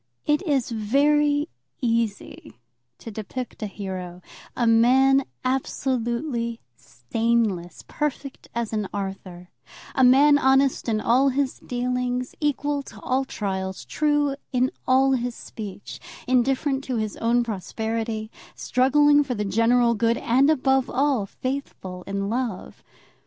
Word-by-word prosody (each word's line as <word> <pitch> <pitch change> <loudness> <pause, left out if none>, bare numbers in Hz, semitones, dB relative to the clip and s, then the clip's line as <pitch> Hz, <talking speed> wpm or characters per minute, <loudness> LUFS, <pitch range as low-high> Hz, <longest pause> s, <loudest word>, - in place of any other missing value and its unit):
It 295 0 +2
is 270 -5 +1
very 290 +7 +2 0.3
easy 230 -4 -2 0.4
to 225 - -9
depict 225 +5 -6
a 215 - -2
hero, 185 -3 -7 0.3
a 240 - +1
man 260 +4 +5 0.2
absolutely 240 -2 -1 0.2
stainless, 190 - -2
perfect 285 -2 -4
as 235 -2 -2
an 210 -3 -2
Arthur, 190 -3 -6 0.4
a 260 - +2
man 285 +3 +6
honest 265 -2 +2
in 215 -1 +1
all 260 +5 +3
his 270 0 -1
dealings, 250 0 -2
equal 290 -1 0
to 220 -5 -13
all 265 +1 0
trials, 190 -5 -4
true 295 -2 +1 0.2
in 255 0 +1 0.2
all 265 +1 +4
his 245 -2 -1
speech, 205 -2 -8 0.3
indifferent 265 +2 +1
to 255 - -2
his 215 -2 -2
own 235 +1 +2
prosperity, 220 +1 -4 0.2
struggling 290 +3 +3
for 260 -3 -3
the 210 -1 -2
general 235 +4 +3
good, 230 +1 +1
and, 265 +5 +3
above 265 -3 +2
all, 265 -6 +1
faithful 255 -8 -5
in 200 0 -2
love. 230 -3 -4
245 Hz, 125 wpm, -24 LUFS, 220-270 Hz, 0.4 s, man